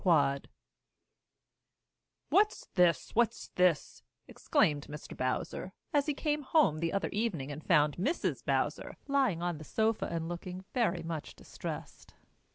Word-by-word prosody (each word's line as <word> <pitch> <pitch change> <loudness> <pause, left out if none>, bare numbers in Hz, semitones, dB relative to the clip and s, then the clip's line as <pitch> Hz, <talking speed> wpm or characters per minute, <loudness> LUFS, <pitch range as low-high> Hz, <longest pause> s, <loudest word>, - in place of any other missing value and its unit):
QUAD 140 -7 +3 1.8
"What's 420 +2 +3
this! 175 -6 +3
What's 235 -1 +1
this!" 180 -4 +1 0.3
exclaimed 155 - +1
Mr. 150 +1 -8
Bowser, 130 +8 -2 0.2
as 290 0 +3
he 300 - 0
came 300 0 0
home 275 - +3
the 165 0 0
other 200 - -1
evening 190 - -2
and 150 +2 -7
found 150 -1 +3
Mrs. 270 - -1
Bowser - - -1
lying 265 - +2
on 175 -3 -1
the - - -8
sofa 220 +6 0
and 165 -1 -3
looking 180 +2 -6
very 190 -9 +1
much 165 -2 -5
distressed. - - -8
175 Hz, 135 wpm, -32 LUFS, 155-235 Hz, 1.8 s, QUAD